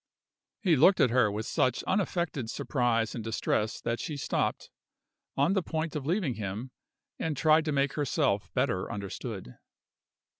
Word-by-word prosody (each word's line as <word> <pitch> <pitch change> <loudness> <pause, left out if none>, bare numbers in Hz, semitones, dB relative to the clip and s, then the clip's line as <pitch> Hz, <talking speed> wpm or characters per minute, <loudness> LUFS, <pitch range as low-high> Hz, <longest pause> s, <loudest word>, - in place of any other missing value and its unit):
He 175 -5 +4
looked 175 +8 +5
at 125 - +4
her 120 -4 +4
with 105 +2 -3
such 125 -2 +1
unaffected 175 - -1
surprise 115 -4 0
and 115 - -5
distress 110 -1 -1
that 115 0 -2
she 150 - -4
stopped, - - -1 0.7
on 145 +7 +3
the 195 - +2
point 160 -1 -3
of 145 -2 -3
leaving 170 - +1
him, 110 +4 -5 0.5
and 160 -3 -2
tried 155 +1 +4
to 155 - 0
make 140 -1 +1
herself 115 -8 0
better 95 +4 0
understood. 100 - -6
130 Hz, 150 wpm, -29 LUFS, 110-160 Hz, 0.7 s, looked